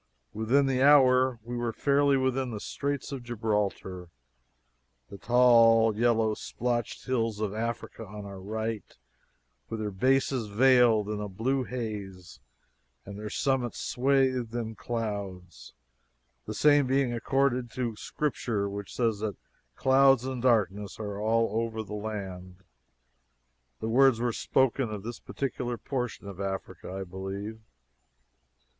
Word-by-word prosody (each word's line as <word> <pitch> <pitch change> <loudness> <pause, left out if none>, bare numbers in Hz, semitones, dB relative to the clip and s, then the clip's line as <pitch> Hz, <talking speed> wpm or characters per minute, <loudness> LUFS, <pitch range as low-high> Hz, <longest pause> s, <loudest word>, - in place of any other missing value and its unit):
Within 120 +6 +2
the 130 -1 +1
hour 130 -3 +5
we 120 +2 -6
were 120 -1 -1
fairly 140 +3 +2
within 130 0 0
the 110 -3 -5
Straits 140 +4 -3
of 135 -2 -5
Gibraltar, 105 -6 -2 1.0
the 100 - -9
tall 115 -2 +5
yellow 115 -1 +2
splotched 120 +1 -3
hills 115 -5 -1
of 105 -2 -2
Africa 115 +1 -4
on 105 0 -8
our 100 -1 -8
right, 110 +1 -4 0.7
with 115 - -4
their 105 -1 -3
bases 130 +3 +1
veiled 115 -1 +4
in 105 0 -3
a 105 - -4
blue 130 +7 -1
haze 100 - -6 0.7
and 100 - -8
their 105 0 -5
summits 130 -1 -1
swathed 130 -3 +1
in 115 -2 -3
clouds 100 -7 -5 0.7
the 110 - -4
same 145 0 +4
being 135 -2 +1
according 130 +1 +1
to 120 -3 -2
Scripture, 115 -6 -2
which 100 0 -6
says 115 -4 +1
that 105 -4 -3 0.4
"clouds 135 -1 +4
and 130 -2 -4
darkness 105 -5 +1
are 105 -1 -5
over 115 0 0
the 105 0 -9
land." 95 -4 -6 1.2
The 110 - -3
words 130 +1 +4
were 120 -1 0
spoken 130 0 +1
of 105 -2 -6
this 120 +1 -6
particular 125 -3 -4
portion 125 -6 -4
of 95 -2 -9
Africa, 95 -1 -5
I 95 +1 -4
believe. 95 +4 -6
115 Hz, 130 wpm, -28 LUFS, 105-130 Hz, 1.2 s, hour